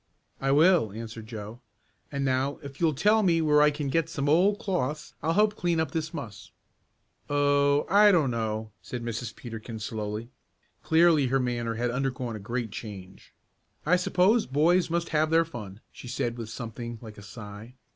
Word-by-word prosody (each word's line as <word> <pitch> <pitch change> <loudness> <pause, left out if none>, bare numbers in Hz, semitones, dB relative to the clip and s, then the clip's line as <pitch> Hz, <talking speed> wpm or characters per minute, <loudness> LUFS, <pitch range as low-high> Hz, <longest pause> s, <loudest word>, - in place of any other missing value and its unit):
"I 135 - 0
will," 155 - +4
answered 115 +1 -8
Joe. 110 0 -8 0.5
"And 140 -1 -2
now 135 +2 0
if 140 +1 -10
you'll 160 -3 +2
tell 210 +9 +4
me 170 -5 +3
where 150 -2 +4
I 150 - +6
can 145 -1 -4
get 165 +3 0
some 145 -4 -2
old 185 +7 +4
cloths 155 - -3
I'll 165 - 0
help 210 +2 +3
clean 175 -5 0
up 160 -4 -1
this 160 0 -3
muss." 110 - -8 0.8
"Oh, 145 0 +3
I 205 +1 +6
don't 155 -9 +3
know," 110 -1 -3
said 125 -1 -6
Mrs. 115 0 -4
Peterkin 115 -1 -8
slowly. 105 +2 -5 0.5
Clearly 160 -4 +4
her 135 +2 +1
manner 120 -2 -2
had 120 +1 -1
undergone 125 -2 -2
a - - -6
great 115 +2 -4
change. 95 -4 -9 0.5
"I 175 +4 +4
suppose 185 - +2
boys 165 +7 +3
must 170 +1 -1
have 155 0 +2
their 165 +1 +4
fun," 110 -9 -9
she - - -11
said 120 -1 -2
with 115 -3 -7
something 115 0 -6
like 110 -2 -11
a - - -10
sigh. 105 +2 -10
135 Hz, 175 wpm, -27 LUFS, 115-160 Hz, 0.8 s, I